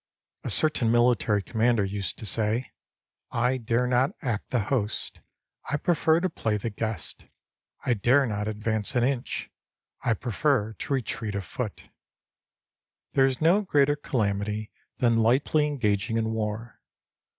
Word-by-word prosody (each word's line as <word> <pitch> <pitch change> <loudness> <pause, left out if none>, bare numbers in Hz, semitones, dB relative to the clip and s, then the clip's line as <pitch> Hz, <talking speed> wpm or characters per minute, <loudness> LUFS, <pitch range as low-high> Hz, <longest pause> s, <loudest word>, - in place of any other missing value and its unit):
A - - -3
certain 145 -7 +3
military 120 -4 +3
commander 115 -1 +2
used 100 0 -3
to - - -8
say: 110 +4 -1 0.3
" - - -58 0.2
I 130 - 0
dare 120 +1 0
not 125 +2 +2
act 115 -5 -2
the 125 - +1
host; 105 -1 -2 0.5
I 150 - +1
prefer 160 0 +2
to 185 - +2
play 110 -11 -1
the 110 +2 -3
guest.* 110 -5 -5 0.6
I 125 - +3
dare 125 +6 +3
not 105 -3 -2
advance 110 +2 -2
an 120 - +3
inch; 130 -1 -2 0.5
I 115 - +2
prefer 120 0 0
to 145 - -4
retreat 115 -4 -2
a 100 - -1
foot." - - -6 1.2
There 135 -1 +5
is 130 +1 -3
no 175 +6 +5
greater 145 -7 +3
calamity 105 -5 -2 0.3
than 115 -2 +3
lightly 135 +6 +3
engaging 115 -5 0
in 110 0 0
war. 110 +1 -4
115 Hz, 145 wpm, -27 LUFS, 105-130 Hz, 1.2 s, There